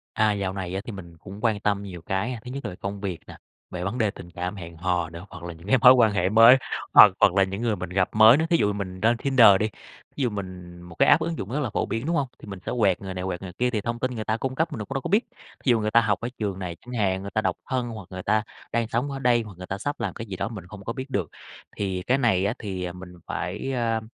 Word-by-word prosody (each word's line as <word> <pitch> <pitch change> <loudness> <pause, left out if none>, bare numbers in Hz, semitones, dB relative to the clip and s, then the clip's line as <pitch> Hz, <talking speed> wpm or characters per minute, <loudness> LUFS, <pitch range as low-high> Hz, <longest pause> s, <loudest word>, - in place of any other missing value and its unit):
À, 110 -2 +3
dạo 100 -2 -2
này 95 -2 -5
á 95 - -1
thì 115 - -6
mình 85 -4 -10
cũng 95 +4 -10
quan 110 -3 +2
tâm 100 -1 0
nhiều 90 -4 -8
cái 95 +7 -2
ha. 120 - -6
Thứ 125 - -7
nhất 140 +2 -6
là - - -4
công 100 0 -4
việc 95 -4 -3
nè, - - -11 0.3
về 90 0 -4
vấn 100 +6 -3
đề 110 -4 +2
tình 85 -3 -12
cảm, 90 +4 -4
hẹn 85 -2 -9
hò 90 -1 -1
nữa, 85 +3 -9
hoặc 90 -3 -10
là 85 - -5
những 85 +2 -14
cái 125 +6 +4
mối 125 +2 +10
quan 115 -5 +4
hệ 95 -2 +1
mới, 115 +5 +8 0.4
hoặc - - +10
hoặc - - +5
là 100 - +4
những 95 +4 -5
người 115 -3 +1
mình - - -6
gặp 95 0 +1
mới 110 +3 +8
nữa. 160 - +1
Thí 170 - +5
dụ 105 -6 +2
mình 95 -2 -5
lên 115 +2 +4
Tinder 130 -1 +5
đi, 110 - +1 0.5
ví - - -2
dụ 125 - +1
mình 90 -4 -7
một 90 -1 -12
cái - - +4
app - - +6
ứng 165 0 -2
dụng 100 - -5
rất 145 - 0
là 130 -6 -2
phổ - - -1
biến, 115 +5 -3
đúng 170 - 0
hông? 140 -4 0
Thì - - -13
mình 100 -2 -6
sẽ - - -2
quẹt 100 -5 +3
người 95 -1 -6
này, 90 0 -4
quẹt 95 -1 -4
người 95 -2 -7
kia, 125 0 +2
thì 110 -3 -1
thông 115 +3 -3
tin 130 +2 -1
người 110 -2 -4
ta 110 - 0
cung 130 +3 -3
cấp 160 +3 -1
mình 145 - -4
cũng 135 - -7
đâu 135 - -1
có - - -4
biết. 210 +5 +3 0.4
Thí 130 - +3
dụ 115 -2 +4
người 105 0 -1
ta 115 - +6
học 105 -3 0
ở 115 - -3
trường 100 -3 -2
này 90 -3 -5
chẳng 125 - -7
hạn, 95 -4 0
người 100 - -6
ta 110 - +3
độc - - -1
thân 125 -2 -1
hoặc 110 -6 -8
người 95 -1 -6
ta 110 +3 +2 0.3
đang 115 -1 0
sống 125 +5 -1
ở 135 - -4
đây 120 -3 +3
hoặc 105 -3 -10
người 90 - -8
ta 95 - -4
sắp 145 +7 -4
làm 105 -6 -2
cái 115 - -7
gì 100 -3 -6
đó - - -2
mình 105 -6 -8
không 100 +1 -11
có 115 - -3
biết 130 +3 -7
được. 95 - -1 0.5
Thì 95 -3 -2
cái 130 +2 +3
này 105 -7 +2
á 100 - 0
thì 90 -4 -4
mình 90 0 -11
phải, 100 +9 -3
ơ, 115 -3 0
105 Hz, 315 wpm, -25 LUFS, 95-120 Hz, 0.5 s, mối